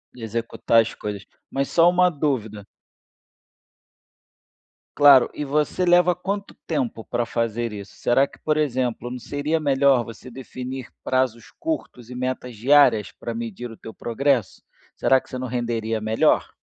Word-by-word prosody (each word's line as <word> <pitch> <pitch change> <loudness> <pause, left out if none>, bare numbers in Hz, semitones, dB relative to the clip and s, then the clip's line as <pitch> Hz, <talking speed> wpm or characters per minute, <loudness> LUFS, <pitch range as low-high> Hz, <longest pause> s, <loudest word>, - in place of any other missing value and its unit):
Executar 115 0 +1
as 115 - -4
coisas. 105 -1 -6 0.2
Mas, 135 0 -2
só 170 +1 +5
uma 180 0 +4
dúvida. 120 - -2 2.3
Claro, 140 -4 +7
e 150 - -4
você 150 +5 0
leva 175 0 +5
quanto 200 +3 -4
tempo 235 - -2
para 120 - -1
fazer 115 0 -2
isso? 100 -1 -9
Será 135 +3 +2
que, - - -18
por 155 0 0
exemplo, 125 -4 -1
não 125 - -5
seria 145 +6 -2
melhor 135 -3 +3
você 115 +3 -11
definir 130 0 -7
prazos 130 -3 -1
curtos 315 - -5
e 125 - -8
metas 125 -2 -4
diárias, 130 -3 +4
para 115 - -6
medir 115 +1 -6
o 115 - -12
teu 110 - -10
progresso? 125 -2 -1 0.4
Será 130 -1 +3
que - - -22
você 130 - -5
não 130 - -4
renderia 115 -2 -2
melhor? 110 +1 +2
125 Hz, 150 wpm, -23 LUFS, 115-145 Hz, 2.3 s, Claro